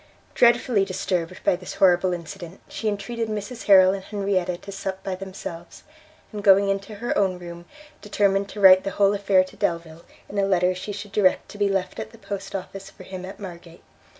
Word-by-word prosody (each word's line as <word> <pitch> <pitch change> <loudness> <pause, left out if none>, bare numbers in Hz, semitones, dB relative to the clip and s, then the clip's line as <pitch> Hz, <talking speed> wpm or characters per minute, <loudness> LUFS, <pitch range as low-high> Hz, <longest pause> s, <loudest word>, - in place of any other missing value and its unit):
Dreadfully 235 -3 +4
disturbed 185 -2 -3
by - - +3
this 185 0 -8
horrible 185 -1 +4
incident, 175 +1 -7
she 220 - -5
entreated 220 +2 -3
Mrs 215 +3 -5
Harrel 190 -2 +7
and 195 -1 -5
Henrietta 195 -3 -1
to 200 - -10
sup 190 -1 -5
by 195 - -3
themselves, 185 -3 -8 0.5
and 210 -2 -6
going 195 0 +6
into 195 +2 -3
her 235 +4 -3
own 190 -3 +1
room, 170 -1 -10 0.4
determined 200 -1 +1
to 210 - -8
write 190 -1 +8
the 195 - -2
whole 200 0 +4
affair 195 -2 +3
to 185 - -13
Delvile, 170 -1 -3 0.3
in 200 - -4
a - - +2
letter 185 -1 +2
she 185 +3 -6
should 205 0 -7
direct 200 -2 +2
to 205 - -11
be 205 -1 +2
left 190 -2 -2
at - - -5
the 230 - -15
post 200 -2 -6
office 195 +1 -7
for 190 - -14
him 185 0 -8
at 190 - -10
Margate. 175 -3 -10
195 Hz, 200 wpm, -24 LUFS, 185-200 Hz, 0.5 s, write